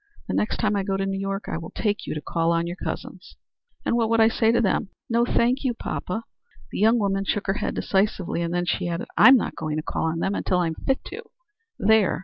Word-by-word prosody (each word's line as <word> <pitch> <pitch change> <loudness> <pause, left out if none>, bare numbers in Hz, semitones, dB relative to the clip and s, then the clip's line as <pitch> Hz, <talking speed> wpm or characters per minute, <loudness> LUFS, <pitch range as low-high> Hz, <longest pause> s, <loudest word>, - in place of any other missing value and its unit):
The - - -3
next 210 - 0
time 210 -2 +1
I 200 - +1
go 195 0 -1
to 195 - -1
New 195 0 -2
York 195 +1 -3
I - - -3
will 165 - -8
take 210 -2 -2
you - - -3
to 150 - -4
call 165 +3 0
on 170 0 +1
your 175 +1 -4
cousins." - - -7 0.5
"And - - +1
what 230 -2 +1
would 230 0 +3
I 225 0 +6
say 225 0 +2
to 235 - +3
them? 210 -2 +1 0.2
No 235 +1 +3
thank 245 +2 +1
you, 250 -3 0
poppa." 220 0 -4 0.5
The - - -4
young 220 +3 +5
woman 195 -2 0
shook 205 +1 -1
her 195 - +1
head - - -2
decisively, 190 -3 0
and 170 0 -2
then 175 0 0
she 175 - -1
added, 170 0 -3
"I'm 260 +1 +8
not - - -3
going 155 -1 -3
to 155 - -2
call - - -2
on 160 0 -1
them, 190 +4 0
until 185 - 0
I'm 170 -2 0
fit 265 - -1
to. 420 +5 -6 0.6
There!" 215 -4 +3
195 Hz, 250 wpm, -24 LUFS, 175-225 Hz, 0.6 s, I'm